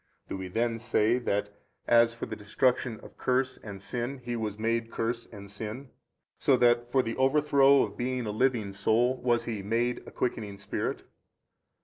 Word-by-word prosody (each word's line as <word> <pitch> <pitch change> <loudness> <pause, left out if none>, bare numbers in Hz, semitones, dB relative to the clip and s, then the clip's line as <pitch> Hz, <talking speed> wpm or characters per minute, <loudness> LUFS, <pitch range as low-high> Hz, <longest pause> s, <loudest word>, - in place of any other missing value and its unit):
Do - - -3
we 95 -1 -5
then 115 +4 -1
say 115 +1 +2
that 105 -3 -1 0.3
as 115 0 +5
for 115 - -5
the - - -6
destruction 115 +2 0
of - - -15
curse 130 0 +1
and 100 -3 -9
sin 120 +6 -4
He 120 -1 -5
was 110 -3 -3
MADE 115 +1 0
curse 115 +1 -2
and 100 -2 -10
sin, 110 +6 -7 0.5
so 135 - +4
that 120 0 +3
for 130 0 +3
the 115 - -3
overthrow 140 0 +5
of - - -5
being 125 0 -2
a 105 - -2
living 110 -3 +1
soul 120 +6 +2
was 120 -1 +2
He 110 -4 -4
MADE 115 +4 0
a - - -9
quickening 105 -5 -3
spirit? 100 0 -3
115 Hz, 175 wpm, -29 LUFS, 105-125 Hz, 0.5 s, as